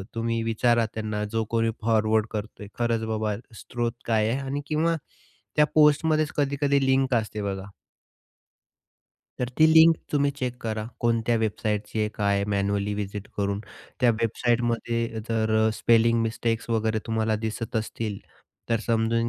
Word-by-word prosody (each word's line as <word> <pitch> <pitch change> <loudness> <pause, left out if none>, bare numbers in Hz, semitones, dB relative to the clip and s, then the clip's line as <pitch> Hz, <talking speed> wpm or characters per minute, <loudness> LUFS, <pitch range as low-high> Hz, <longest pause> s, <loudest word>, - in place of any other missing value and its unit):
तुम्ही 115 0 -1
विचारा 115 +1 +2
त्यांना, 110 -1 -3
जो 110 +2 -1
कोणी 115 0 +2
फॉरवर्ड 110 -1 +2
करतोय. 105 -1 -6
खरंच 115 -1 +1
बाबा 110 -1 -1 0.2
स्रोत 120 +1 -3
काय 110 -1 +2
आहे? 125 +4 0
आणि 140 +1 -3
किंवा 160 +2 +1 0.6
त्या 150 - +5
पोस्टमध्येच 155 0 +4
कधी-कधी 140 -1 +1
लिंक 130 0 +2
असते 110 -2 -2
बघा. 100 -1 -4 1.7
तर 125 - -1
ती 155 - +7
लिंक 160 +1 +7 0.2
तुम्ही 145 -1 +2
चेक 125 -3 -2
करा 110 -1 -3
कोणत्या 115 0 +1
वेबसाईटची 110 -1 -2
आहे 105 - +1
काय 100 -1 +1
मॅन्युअली 100 0 0
व्हिजिट 100 0 -5
करून. 100 0 -1 0.4
त्या 125 - +5
वेबसाईटमध्ये 115 0 0
जर 110 -1 0 0.2
स्पेलिंग 115 +1 +3
मिस्टेक्स 115 0 -2
वगैरे 110 -1 +1
तुम्हाला 110 -1 0
दिसत 110 +1 -3
असतील, 110 -1 -3 0.5
तर 115 -1 +1
समजून 115 0 +1
115 Hz, 135 wpm, -26 LUFS, 110-120 Hz, 1.7 s, ती